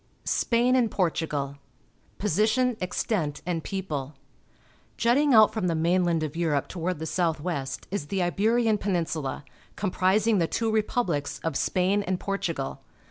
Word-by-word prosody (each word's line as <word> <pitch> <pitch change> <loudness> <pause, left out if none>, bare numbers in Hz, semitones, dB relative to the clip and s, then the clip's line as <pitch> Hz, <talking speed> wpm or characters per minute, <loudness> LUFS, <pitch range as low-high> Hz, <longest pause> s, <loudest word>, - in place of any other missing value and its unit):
SPAIN 245 +2 +2
AND 245 -3 +3
PORTUGAL 160 -7 -1
(f 140 - -13
> - - -22
»v_^ 125 -3 -37
Position, 220 +6 +2
Extent, 180 -4 -2
and 170 -3 -2
People. 155 -8 -4 0.4
— - - -34
.hitting 275 +5 +3
out 215 -1 +7
from 215 -5 -1
the 165 - +1
mainland 170 0 +2
of 155 0 -4
Europe 160 -5 0
toward 180 0 -3
the 160 - -5
south 165 -1 0
west 140 -5 -4
is 195 -7 -3
the 190 +1 0
Iberian 220 +4 +2
Peninsula, 165 -8 -2 0.3
com 195 -3 -2
prising 200 +4 +2
the 165 - +2
two 225 +4 -1
republics 210 -9 0
of 165 -3 -2
Spain 190 +7 +1
and 185 -2 -2
Portugal. 170 -8 -3
180 Hz, 160 wpm, -26 LUFS, 155-210 Hz, 0.4 s, out